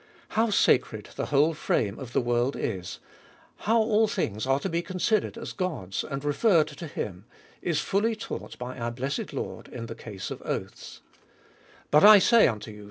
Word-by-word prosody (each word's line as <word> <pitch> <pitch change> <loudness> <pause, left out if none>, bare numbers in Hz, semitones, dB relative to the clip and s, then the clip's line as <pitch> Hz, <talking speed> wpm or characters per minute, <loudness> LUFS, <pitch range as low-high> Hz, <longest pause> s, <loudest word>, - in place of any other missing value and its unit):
How 225 +1 +1
sacred 110 - +2
the - - -3
whole 150 +3 +3
frame 110 -8 -1
of 130 -3 -8
the - - +1
world 120 +2 0
is, 90 -4 -4 0.6
how 225 +2 +1
all 220 -1 +3
things 110 - -2
are 135 +1 +3
to - - -2
be 170 -2 -1
considered 190 +5 0
as 230 - -6
God's, 145 - -3
and 140 +1 -5
referred 155 +1 +3
to 160 +3 -8
him, 95 - -6 0.4
is 160 -4 0
fully 215 +3 +1
taught 215 - -7
by 125 +1 -6
our 120 0 -2
blessed 135 +4 -3
Lord - - -5
in 115 -2 -7
the - - -6
case 100 -5 -8
of - - -6
oaths: - - -6 0.9
But 150 - +6
I 210 0 +11
say 230 +3 +6
unto 110 -2 -4
you. 105 - -12
145 Hz, 180 wpm, -27 LUFS, -, 0.9 s, I